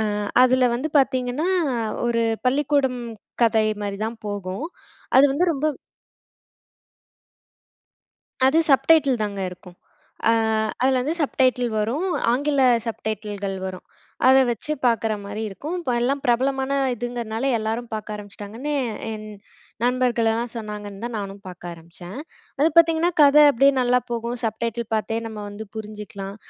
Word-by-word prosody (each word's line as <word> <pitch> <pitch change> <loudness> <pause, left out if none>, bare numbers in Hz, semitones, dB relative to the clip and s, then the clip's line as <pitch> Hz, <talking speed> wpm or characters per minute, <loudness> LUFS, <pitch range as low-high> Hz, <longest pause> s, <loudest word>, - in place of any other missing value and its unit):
அ - - +1 0.4
அதுல 255 0 +4
வந்து 285 +6 -3
பாத்தீங்கன்னா, 260 +4 -1 0.6
ஒரு 230 -1 +1 0.3
பள்ளிக்கூடம் 270 -2 +1 0.4
கதை 220 -1 +3 0.2
மாதிரி 200 -1 -3
தான் 225 0 -6
போகும். 200 +6 -4 0.5
அது 265 - +8
வந்து 325 +6 +2
ரொம்ப 280 +3 -1 2.8
அது 290 +5 +3
சப்டைட்டில் 275 -4 +4
தாங்க 200 -1 -4
இருக்கும். 180 0 -13 0.5
அ - - +6 0.5
அதில 260 0 +3
வந்து 295 +5 -1
சப்டைட்டில் 255 -3 +1
வரும். 245 - -1 0.3
ஆங்கில 280 +2 +1 0.2
சப்டைட்டில்கள் 210 -3 -4
வரும். 185 -1 -7 0.4
அதை 265 +1 +7
வச்சு 240 +6 -3
பார்க்குற 225 -2 +2
மாரி 205 +2 -5
இருக்கும். 295 - -5
இப்பல்லாம் 255 -1 0
பிரபலமான 265 +2 +1 0.2
இதுங்கிறனால, 240 0 -4
எல்லாரும் 225 +2 -3
பார்க்க 215 0 -4
ஆரம்பிச்சுட்டாங்கன்னு 210 +7 -6 0.4
என் 215 -1 -7 0.6
நண்பர்கள்லாம் 240 -2 +1
சொன்னாங்கன்னு 210 -2 -7
தான் 240 -1 -5
நானும் 200 -1 -6
பார்க்க 180 -1 -8
ஆரம்பிச்சேன். 170 +5 -11 0.4
அது 300 - +5
பார்த்தீங்கன்னா, 330 +1 +5
கதை 295 +1 +7
அப்படியே 275 +3 +4
நல்லா 250 0 +3
போகும். 235 +1 -3
சப்டைட்டில் 230 +1 -2
பார்த்தே 225 +1 -1
நம்ம 220 -1 -7
வந்து 210 +2 -8
புரிஞ்சுக்கலாம். 210 -2 -7
235 Hz, 120 wpm, -23 LUFS, 210-265 Hz, 2.8 s, அது